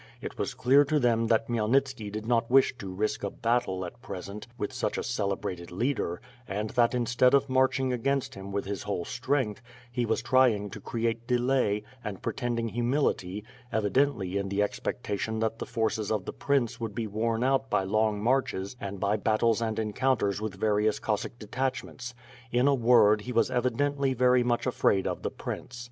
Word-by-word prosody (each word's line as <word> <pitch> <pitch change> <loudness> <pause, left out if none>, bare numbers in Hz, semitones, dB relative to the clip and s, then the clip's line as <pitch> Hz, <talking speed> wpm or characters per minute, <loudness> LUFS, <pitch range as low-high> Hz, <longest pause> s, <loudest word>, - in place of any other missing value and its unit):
It - - -7
was - - -2
clear 135 +3 +5
to 150 +1 +1
them 115 -3 +2
that 115 0 +2
Khmyelnitski 120 -1 0
did 110 +1 -5
not 115 -1 +1
wish 135 +1 +5
to 95 -3 -6
risk 105 +3 -2
a 100 - 0
battle 115 -5 0
at 120 +7 -10
present 100 -2 -7
with 105 -4 -3
such - - -2
a - - -2
celebrated 100 -6 -3
leader 105 -4 -1 0.3
and 105 +2 -3
that 120 -1 +3
instead 125 +2 +3
of 140 0 +3
marching 130 0 +2
against 135 +2 -1
him 95 +1 -8
with 100 0 -2
his 100 0 -4
whole 100 -4 -3
strength, 130 -4 -1 0.3
he 120 -1 -1
was 110 +1 0
trying 120 -7 +3
to - - -8
create 115 0 -2
delay, 125 -4 +1 0.2
and 105 -4 -6
pretending 120 -3 -2
humility, 120 -5 0 0.3
evi 105 -3 0
dently 130 -10 +1
in 100 0 -2
the 100 +1 +1
expectation 105 +1 -3
that 110 +1 -1
the - - -5
forces 110 -3 -1
of 105 -4 -1
the - - -5
prince 130 -5 0
would 110 -3 -4
be 115 - -2
worn 115 +2 -1
out 135 0 +1
by 95 - +2
long 105 +1 +1
marches 120 -5 0
and 100 0 -5
by 100 +2 +1
battles 110 +2 +2
and 110 -1 -1
encounters 110 -2 0
with 110 -3 -3
various 105 +1 +1
Cossack 110 +2 -2
detachments; 125 +1 -4 0.4
in 125 +3 +3
a 140 - +5
word 115 -4 +5
he 125 - -6
was 115 +2 +2
evi 125 0 +2
dently 140 +1 0
very 125 0 +5
much 120 -1 0
afraid 100 -6 +2
of - - -2
the - - -2
prince. 125 - -6
115 Hz, 190 wpm, -28 LUFS, 105-125 Hz, 0.4 s, clear